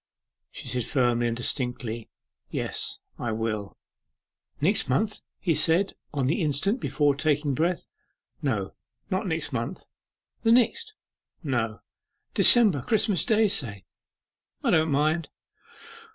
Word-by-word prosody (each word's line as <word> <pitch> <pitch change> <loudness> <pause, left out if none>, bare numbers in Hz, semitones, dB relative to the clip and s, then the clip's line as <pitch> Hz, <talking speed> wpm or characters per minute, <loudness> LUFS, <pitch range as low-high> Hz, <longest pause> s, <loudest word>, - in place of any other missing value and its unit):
She - - -9
said 125 -2 -2
firmly 120 -3 +2
and 115 0 -2
distinctly, 120 -2 -2 0.4
'Yes, - - -3 0.2
I 120 - -2
will.' 110 -2 -3 0.8
'Next 175 +1 +1
month?' 210 - 0 0.2
he 170 - +1
said 165 +5 +2 0.2
on 140 -4 -1
the 145 +7 +1
instant, 160 - +1
before 145 -10 +2
taking 145 0 +1
breath. 170 +6 0 0.6
'No; 110 -10 -1 0.4
not 190 +2 0
next 160 -4 -2
month.' 115 -1 -3 0.6
'The 225 0 +4
next?' 430 - +2 0.5
'No.' 120 -7 -1 0.5
'December? 210 - +6
Christmas 205 - +1
Day, 220 -2 +3
say?' 105 - -2 0.8
'I - - +2
don't 160 0 +3
mind. 155 +2 +1
145 Hz, 120 wpm, -26 LUFS, 120-185 Hz, 0.8 s, December